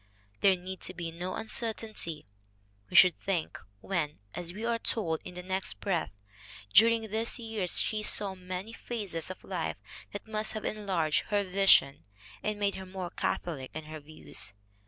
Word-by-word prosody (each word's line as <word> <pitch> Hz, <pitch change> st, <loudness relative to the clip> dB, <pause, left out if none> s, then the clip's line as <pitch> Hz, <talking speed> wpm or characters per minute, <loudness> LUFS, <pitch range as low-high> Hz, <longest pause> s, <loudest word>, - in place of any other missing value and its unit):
There 195 Hz, -1 st, +6 dB
need 185 Hz, +1 st, -7 dB
be 170 Hz, -1 st, -4 dB
no 180 Hz, +3 st, -4 dB
uncertainty, 220 Hz, -, -1 dB, 0.6 s
we -, -, -7 dB
should 180 Hz, -3 st, +8 dB
think, 180 Hz, -5 st, -1 dB, 0.2 s
when, 165 Hz, -6 st, -1 dB, 0.2 s
as 175 Hz, -1 st, -3 dB
we 210 Hz, +5 st, -5 dB
are 235 Hz, -1 st, +1 dB
told 165 Hz, -9 st, 0 dB
in 180 Hz, -, -9 dB
the 180 Hz, -, -6 dB
next 190 Hz, +1 st, -1 dB
breath, 180 Hz, -, 0 dB, 0.6 s
"during 225 Hz, -1 st, +6 dB
these 225 Hz, +2 st, +1 dB
years 225 Hz, -6 st, 0 dB
she 215 Hz, -1 st, 0 dB
saw 205 Hz, -2 st, +3 dB
many 185 Hz, +3 st, -6 dB
phases 200 Hz, -9 st, -3 dB
of 185 Hz, -, -8 dB
life 180 Hz, -4 st, -2 dB, 0.3 s
that 205 Hz, -, -6 dB
must 215 Hz, 0 st, +1 dB
have 215 Hz, -, -4 dB
enlarged 185 Hz, -7 st, +1 dB
her 205 Hz, -1 st, +2 dB
vision 185 Hz, -7 st, +5 dB, 0.4 s
and 210 Hz, -1 st, -2 dB
made 200 Hz, -1 st, +2 dB
her 190 Hz, -, -6 dB
more 185 Hz, -2 st, -5 dB
catholic 140 Hz, -7 st, -2 dB
in 155 Hz, -, -4 dB
her 155 Hz, +1 st, -7 dB
views." 145 Hz, -8 st, -5 dB
190 Hz, 160 wpm, -31 LUFS, 170-215 Hz, 0.6 s, should